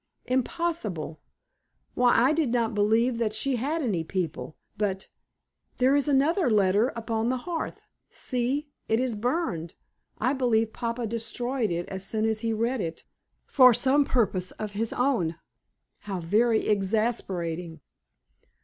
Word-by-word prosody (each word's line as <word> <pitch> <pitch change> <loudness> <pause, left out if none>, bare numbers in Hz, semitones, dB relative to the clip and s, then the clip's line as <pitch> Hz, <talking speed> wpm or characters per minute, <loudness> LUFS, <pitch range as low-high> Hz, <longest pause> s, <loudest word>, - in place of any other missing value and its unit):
"Impossible! 250 - -2 0.7
Why, 245 -1 +4
I 260 +5 +4
did 310 -4 +1
not 235 -1 0
believe 225 +4 +2
that 220 -2 0
she 250 +4 0
had 295 +7 -1
any 190 -10 0
people. 165 -2 -4 0.2
But 200 -2 -2 0.7
there 260 +2 +4
is 285 0 +2
another 295 +4 +3
letter 205 +1 +3
upon 230 0 -1
the 255 - 0
hearth. 330 +5 -4 0.3
See! 260 +4 -2 0.2
it 225 - +3
is 255 -2 0
burned. 215 - -2 0.4
I 255 +5 +1
believe 225 -4 +1
papa 235 0 -3
destroyed 230 +2 -2
it 175 0 -2
as 190 0 -5
soon 220 +2 -1
as 220 -1 +1
he 225 0 -1
read 230 +2 0
it, 165 -2 -5 0.4
for 255 -4 +6
some 275 +5 +3
purpose 200 -9 0
of 215 -1 -5
his 220 +2 -2
own. 240 -11 +1 0.6
How 195 -3 -5
very 220 +7 +2
exasperating!" 190 -6 -1
230 Hz, 140 wpm, -27 LUFS, 200-255 Hz, 0.7 s, for